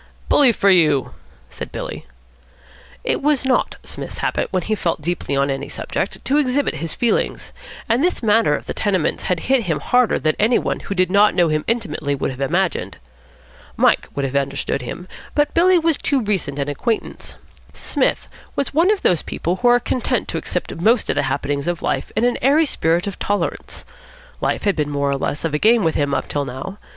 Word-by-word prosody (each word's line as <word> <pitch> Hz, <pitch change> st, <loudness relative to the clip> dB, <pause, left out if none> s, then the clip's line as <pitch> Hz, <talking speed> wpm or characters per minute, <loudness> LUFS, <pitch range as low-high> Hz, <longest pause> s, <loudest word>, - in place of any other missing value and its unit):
"Bully 280 Hz, -4 st, +6 dB
for 200 Hz, -3 st, +3 dB
you," 155 Hz, -7 st, +3 dB, 0.4 s
said -, -, -7 dB
Billy. -, -, -6 dB, 1.0 s
It -, -, -1 dB
was 290 Hz, -2 st, +2 dB
not 260 Hz, -, +1 dB
Psmith's -, -, -8 dB
habit, -, -, -1 dB
when 185 Hz, -2 st, -1 dB
he 215 Hz, -, -1 dB
felt 175 Hz, -6 st, -1 dB
deeply 170 Hz, -4 st, -2 dB
on 140 Hz, 0 st, +1 dB
any 135 Hz, +1 st, -4 dB
subject, -, -, -4 dB
to 280 Hz, -, +2 dB
exhibit 285 Hz, -1 st, +1 dB
his 165 Hz, -1 st, -5 dB
feelings; 240 Hz, -, -1 dB, 0.3 s
and 235 Hz, +5 st, +2 dB
this 360 Hz, -7 st, 0 dB
matter 210 Hz, -8 st, +3 dB
of -, -, -6 dB
the -, -, -4 dB
tenements 190 Hz, -6 st, 0 dB
had 180 Hz, -2 st, 0 dB
hit 260 Hz, -3 st, +1 dB
him 160 Hz, -5 st, -1 dB
harder 250 Hz, -, +2 dB
than 155 Hz, 0 st, 0 dB
any 225 Hz, +4 st, +4 dB
one -, -, -2 dB
who 200 Hz, -, -5 dB
did 185 Hz, -1 st, +1 dB
not 205 Hz, 0 st, +4 dB
know 175 Hz, -3 st, +3 dB
him 155 Hz, 0 st, 0 dB
intimately 155 Hz, -11 st, -1 dB
would 135 Hz, -, -2 dB
have 130 Hz, +1 st, -8 dB
imagined. 175 Hz, +7 st, -1 dB, 0.8 s
Mike -, -, +3 dB
would 140 Hz, -, -1 dB
have 135 Hz, +1 st, -4 dB
understood 140 Hz, 0 st, -1 dB
him, 165 Hz, +9 st, -7 dB, 0.3 s
but 295 Hz, -1 st, +2 dB
Billy 365 Hz, +2 st, +5 dB
Windsor 330 Hz, -, -1 dB
was 325 Hz, -3 st, +3 dB
too 275 Hz, -4 st, 0 dB
recent 190 Hz, -9 st, -1 dB
an 140 Hz, -1 st, -2 dB
acquaintance. 220 Hz, -, -3 dB, 0.4 s
Psmith -, -, -1 dB, 0.3 s
was 280 Hz, -, -1 dB
one 330 Hz, +6 st, +4 dB
of 420 Hz, -2 st, +1 dB
those 175 Hz, -4 st, +3 dB
people 175 Hz, +3 st, -3 dB
who 245 Hz, -, +1 dB
are 245 Hz, 0 st, +6 dB
content 245 Hz, +1 st, -1 dB
to -, -, -2 dB
accept -, -, -3 dB
most 220 Hz, +7 st, +2 dB
of -, -, -3 dB
the 145 Hz, -, +2 dB
happenings 140 Hz, +1 st, -2 dB
of 175 Hz, -1 st, -2 dB
life -, -, -1 dB
in -, -, +1 dB
an 245 Hz, 0 st, +1 dB
airy 290 Hz, +5 st, +4 dB
spirit 170 Hz, -, +1 dB
of 200 Hz, -2 st, -5 dB
tolerance. 205 Hz, 0 st, -3 dB, 0.6 s
Life -, -, -1 dB
had 200 Hz, -2 st, +2 dB
been 150 Hz, -2 st, -1 dB
more 140 Hz, -1 st, 0 dB
or 140 Hz, -, 0 dB
less 145 Hz, +3 st, -3 dB
of 160 Hz, -, -2 dB
a 150 Hz, -, +1 dB
game 225 Hz, +2 st, +4 dB
with 160 Hz, -1 st, +2 dB
him 145 Hz, -1 st, 0 dB
up -, -, -2 dB
till 145 Hz, -, -1 dB
now. 135 Hz, +10 st, -7 dB
185 Hz, 205 wpm, -20 LUFS, 145-240 Hz, 1.0 s, Bully